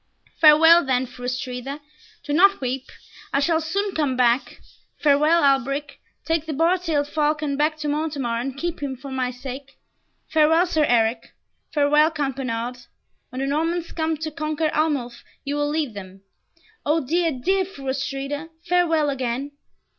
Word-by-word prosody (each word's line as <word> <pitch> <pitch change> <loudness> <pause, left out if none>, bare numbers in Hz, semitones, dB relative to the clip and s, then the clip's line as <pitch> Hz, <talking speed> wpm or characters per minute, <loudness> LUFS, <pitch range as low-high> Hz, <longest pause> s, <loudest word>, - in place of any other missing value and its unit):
"Farewell 325 +2 +7
then, 260 -1 +1
Fru 245 0 -10
Astrida. 255 +2 -4 0.4
Do 290 - -3
not 395 +5 +5
weep. 260 0 -3 0.5
I 275 - +2
shall 320 +3 +2
soon 390 +5 -2
come 285 -5 0
back. 245 +1 +1 0.4
Farewell, 300 +3 +3
Alberic. 275 +1 +1 0.3
Take 325 -1 -1
the 310 - -2
bar 335 +5 +2
tailed 310 -5 -1
falcon 300 -1 0
back 305 +2 +1
to 300 -1 -4
Montemar, 290 -6 -1
and 270 +2 -5
keep 340 +3 -3
him 275 -2 -3
for 270 +2 -9
my 255 -1 -1
sake. 265 +2 -8 0.5
Farewell, 320 +2 +4
Sir 315 -4 +1
Eric 230 -2 +1 0.4
Farewell, 300 +1 +4
Count 285 -4 -2
Bernard. 245 -1 -4 0.5
When 255 +1 -5
the - - 0
Normans 330 +4 -1
come 320 -1 -1
to 315 +1 -4
conquer 310 0 -2
Arnulf 285 -6 -1 0.2
you 280 - -3
will 290 0 0
lead 300 -5 -1
them. 190 -1 -10 0.6
O 305 0 +1
dear, 335 +4 +1
dear 375 +9 0
Fru 355 -8 -11
Astrida, 275 +3 -3
farewell 325 -4 +2
again." 260 +1 -3
290 Hz, 155 wpm, -23 LUFS, 265-320 Hz, 0.6 s, Farewell